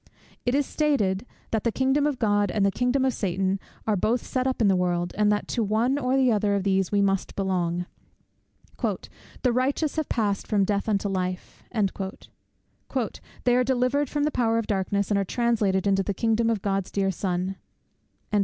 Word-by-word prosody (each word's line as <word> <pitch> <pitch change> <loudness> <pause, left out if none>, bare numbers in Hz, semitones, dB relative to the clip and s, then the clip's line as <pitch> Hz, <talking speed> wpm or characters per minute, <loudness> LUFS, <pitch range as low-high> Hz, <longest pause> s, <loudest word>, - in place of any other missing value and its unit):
It 245 - +3
is 285 0 +2
stated, 250 -11 0 0.2
that 220 -2 0
the 235 - +1
kingdom 270 +4 +2
of 290 -3 -1
God 205 -3 +2
and 200 +1 +1
the 200 - +3
kingdom 250 +5 +1
of 260 - +2
Satan 190 -1 -1 0.3
are 215 - +2
both 225 +6 0
set 255 0 -1
up 260 - -1
in 220 - +4
the 195 - +4
world, 175 -1 0
and 210 0 +3
that 210 - 0
to - - -3
the 230 - +3
one 235 +7 +1
or 260 0 +1
the 260 -2 +4
other 205 -1 +2
of 200 - 0
these 190 -1 +1
we 200 -1 +3
must 195 -1 0
belong. 180 -3 -1 1.0
"The 250 -2 -3
righteous 275 +5 0
have 315 - -1
passed 205 -4 0
from 205 -3 +2
death 200 +2 -1
unto 200 -1 +1
life" 185 -2 -4
"they 200 +4 -4
are 250 - +4
delivered 260 +2 +1
from 295 -1 -1
the 300 - +1
power 230 -4 +1
of 230 - 0
darkness, 200 0 -1
and 200 - +3
are - - +1
translated 210 -3 +1
into 195 -1 +3
the 195 +1 -2
kingdom 230 +2 +1
of 220 -4 -1
God's 195 -2 -1
dear 195 -1 0
Son." 185 +1 -2
210 Hz, 190 wpm, -26 LUFS, 195-250 Hz, 1.0 s, in